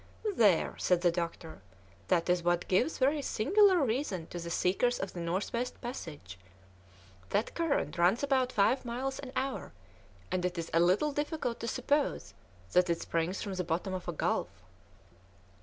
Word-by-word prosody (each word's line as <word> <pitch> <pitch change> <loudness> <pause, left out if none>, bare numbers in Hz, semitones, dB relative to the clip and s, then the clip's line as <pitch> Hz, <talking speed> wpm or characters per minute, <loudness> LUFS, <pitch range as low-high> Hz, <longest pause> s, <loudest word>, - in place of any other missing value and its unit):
"There," 200 - +3
said 180 -1 +2
the 175 -1 +4
doctor, 170 - -5 0.5
"that 170 -1 +2
is 180 0 +2
what 175 0 0
gives 215 - +2
very 285 +3 +2
singular 370 - +4
reason 220 - -2
to 175 - -5
the 170 0 -6
seekers 195 +8 +1
of 195 - -4
the 175 - -6
North 170 +4 -2
West 245 +1 -3
passage! 150 - -7 0.9
That 210 - 0
current 325 - -1
runs 185 +9 +3
about 260 -3 +2
five 245 +5 +2
miles 260 +3 -3
an 265 -2 -7
hour, 270 0 -3 0.6
and 185 -1 0
it 180 0 -1
is 165 0 -4
a 165 - +4
little 185 - +3
difficult 295 -4 -2
to 230 - -4
suppose 275 - 0 0.4
that 180 0 +4
it 170 - +1
springs 170 +3 -2
from 200 - -4
the 185 -1 -2
bottom 175 +3 -2
of 185 -1 -5
a - - 0
gulf." 160 - 0
195 Hz, 170 wpm, -31 LUFS, 175-260 Hz, 0.9 s, the